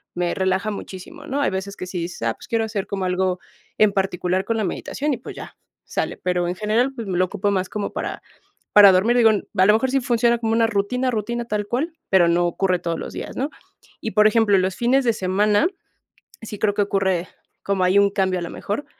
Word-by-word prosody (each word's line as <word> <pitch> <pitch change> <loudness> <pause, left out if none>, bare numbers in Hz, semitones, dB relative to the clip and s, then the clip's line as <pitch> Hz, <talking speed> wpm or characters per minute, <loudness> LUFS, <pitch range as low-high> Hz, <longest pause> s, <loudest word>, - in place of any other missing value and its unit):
me 175 0 0
relaja 190 +2 0
muchísimo, 190 -2 -9
¿no? 280 +2 -1
Hay - - +2
veces 190 +1 -4
que 185 - -6
sí 180 -1 -4
dices: 170 -4 -6
"Ah, 115 -1 +1
pues - - -14
quiero 230 -1 0
hacer 210 -3 -3
como 195 -2 -3
algo 185 0 0 0.4
en 215 -1 +5
particular 190 -1 -1
con 230 -1 -1
la 215 - 0
meditación". 285 - -3
Y 250 - -2
pues 245 - -10
ya, - - -9 0.3
sale. - - -3
Pero 180 -1 -1
en 175 - -1
general, 225 +6 +1
pues 230 -3 -6
me 180 -2 -2
lo 185 - +3
ocupo 195 +3 -2
más 190 -1 0
como 210 -1 -4
para, - - -4 0.5
para 205 -1 +9
dormir, 215 +7 +3
digo, 225 -2 +6
a 190 -2 0
lo 210 - +6
mejor 245 +4 +2
sí 270 0 +2
funciona 235 -1 +2
como 225 -1 -1
una 225 0 +3
rutina, 230 +5 0
rutina 235 +2 -2
tal 210 -2 -2
cual, 305 +9 -2 0.2
pero 185 -3 +5
no 175 +1 +2
ocurre 185 +1 0
todos 170 -1 -3
los - - -6
días, - - -7
¿no? 275 +4 -1 0.5
Y, 220 - -3
por 210 +2 +5
ejemplo, 215 -2 +3
los 185 0 -1
fines 255 +3 +2
de 235 - +3
semana, 205 - +2 0.7
sí 215 -2 -7
creo 205 -2 +2
que 205 - +2
ocurre 190 -3 0 0.4
como 195 -2 0
ahí 185 +2 +4
un 200 0 +4
cambio 190 -2 0
a - - -6
lo 170 - -5
mejor, 210 +8 -4
200 Hz, 230 wpm, -22 LUFS, 185-225 Hz, 0.7 s, para